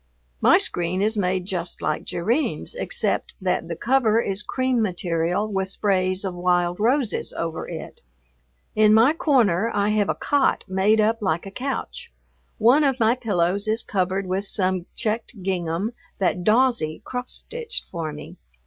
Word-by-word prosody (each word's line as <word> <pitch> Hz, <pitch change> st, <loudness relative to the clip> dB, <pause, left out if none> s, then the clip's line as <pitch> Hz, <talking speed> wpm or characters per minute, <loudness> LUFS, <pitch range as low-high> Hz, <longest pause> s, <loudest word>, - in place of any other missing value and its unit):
My -, -, +6 dB
screen 175 Hz, +1 st, 0 dB
is 220 Hz, +2 st, +1 dB
made 185 Hz, -2 st, 0 dB
just 180 Hz, -2 st, -4 dB
like 155 Hz, -, -2 dB
Jerrine's 235 Hz, -, -1 dB
except -, -, -2 dB
that -, -, -1 dB
the -, -, -4 dB
cover 235 Hz, -3 st, +2 dB
is 195 Hz, -3 st, -1 dB
cream 255 Hz, +2 st, 0 dB
material 175 Hz, 0 st, -1 dB
with 190 Hz, -2 st, -2 dB
sprays 190 Hz, -1 st, 0 dB
of 190 Hz, -, -3 dB
wild 175 Hz, 0 st, +1 dB
roses 240 Hz, 0 st, +1 dB
over 165 Hz, -1 st, -4 dB
it. -, -, -8 dB, 0.7 s
In 215 Hz, 0 st, +5 dB
my 235 Hz, +7 st, +5 dB
corner 230 Hz, -, +2 dB
I 205 Hz, 0 st, +2 dB
have 210 Hz, -2 st, +1 dB
a -, -, +1 dB
cot 285 Hz, -1 st, +1 dB
made 195 Hz, +3 st, +2 dB
up 220 Hz, +2 st, +2 dB
like 170 Hz, -3 st, -1 dB
a 195 Hz, -, -8 dB
couch. 275 Hz, -, -5 dB, 0.5 s
One 250 Hz, +7 st, +5 dB
of 270 Hz, -2 st, +1 dB
my 225 Hz, 0 st, +4 dB
pillows 200 Hz, -4 st, 0 dB
is 220 Hz, +2 st, 0 dB
covered 190 Hz, 0 st, -1 dB
with 190 Hz, +2 st, -2 dB
some 185 Hz, -2 st, 0 dB
checked 220 Hz, -2 st, -3 dB
gingham 180 Hz, +2 st, -1 dB, 0.3 s
that 180 Hz, -2 st, 0 dB
"Dawsie" 220 Hz, -8 st, +2 dB
cross 250 Hz, 0 st, -4 dB
stitched 475 Hz, 0 st, -2 dB
for 165 Hz, -3 st, -5 dB
me. 150 Hz, -, -10 dB
200 Hz, 160 wpm, -23 LUFS, 180-230 Hz, 0.7 s, My